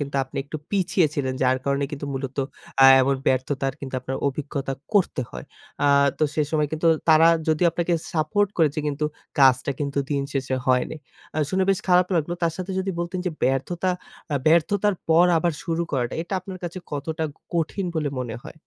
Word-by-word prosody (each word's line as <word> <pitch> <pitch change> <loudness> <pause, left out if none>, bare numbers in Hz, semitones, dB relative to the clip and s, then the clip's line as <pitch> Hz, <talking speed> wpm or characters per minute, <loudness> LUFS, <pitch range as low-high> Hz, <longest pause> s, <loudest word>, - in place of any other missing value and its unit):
কিন্তু 140 -1 -3
আপনি 130 - -13
একটু 150 +2 -6
পিছিয়ে 185 -3 +2
ছিলেন। 130 -2 -1
যার 130 0 +3
কারণে 140 0 +1
কিন্তু 145 -1 -5 0.7
অ্যা 135 - +9 0.2
এমন 135 +1 +2
ব্যর্থতার 135 +1 0
কিন্তু 135 -2 -6
আপনার 130 +1 -4
অভিজ্ঞতা 140 -1 -4 0.2
করতে 180 -8 +2
হয়। 60 - -8 0.4
আ - - +4 0.3
তো 155 - +3
সেসময় 150 0 +1
কিন্তু 155 +2 -1 0.2
তারা 160 +1 +7 0.2
যদি 155 +2 +2
আপনাকে 170 +1 -1 0.2
সাপোর্ট 175 +6 +1
করেছে 155 -2 +2
কিন্তু 150 +1 -1 0.3
কাজটা 130 0 +5
কিন্তু 140 0 -2
দিন 140 -1 +1
শেষে 135 -1 -1
হয়নি। 130 +4 +1 0.4
আ - - +1
শুনে 190 0 +2
বেশ 195 - +2
খারাপ 180 0 +5
লাগলো। 165 +2 0
তার 165 -1 +2
সাথে 185 +1 -5
যদি 190 +1 -1
বলতেন, 175 +2 -3
যে - - +1
ব্যর্থতা 170 +8 0 0.4
আ - - +1
ব্যর্থতার 190 +5 +3
পর 170 +2 +6
আবার 170 0 +1
শুরু 165 0 0
করাটা 125 -3 -1
এটা 175 +3 -5
আপনার 185 0 -8
কাছে 175 +2 -5
কতটা 155 +2 -3 0.3
কঠিন 170 +4 -1
বলে 150 -2 0
মনে 120 -3 -4
হয়? - - -10
155 Hz, 180 wpm, -24 LUFS, 135-175 Hz, 0.7 s, অ্যা